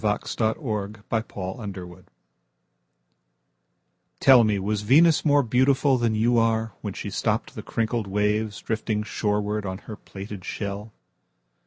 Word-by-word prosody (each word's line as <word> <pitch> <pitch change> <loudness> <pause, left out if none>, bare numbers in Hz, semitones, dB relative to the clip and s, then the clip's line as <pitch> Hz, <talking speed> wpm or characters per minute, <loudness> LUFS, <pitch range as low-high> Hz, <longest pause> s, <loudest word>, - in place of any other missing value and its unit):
Venus 105 -2 -1
Transiens 110 -3 -2
By 115 - +2
Amy 100 0 -6
Lowell 90 -1 -10 2.2
TELL 130 -3 +7
me, 105 -2 +2
Was 105 +2 -1
Venus 150 +9 +5
more 145 -2 +4
beautifulThan 130 -1 +2
you 115 +2 +3
are, 115 -1 +1
When - - -5
she - - -5
stoppedThe - - -2
crinkled 115 -1 -2
waves, 105 +2 0
Drifting 110 -1 -1
shorewardOn 105 -2 -2
her 110 - -9
plaited 100 -2 -9
shell? 100 +2 -5
110 Hz, 120 wpm, -25 LUFS, 105-115 Hz, 2.2 s, TELL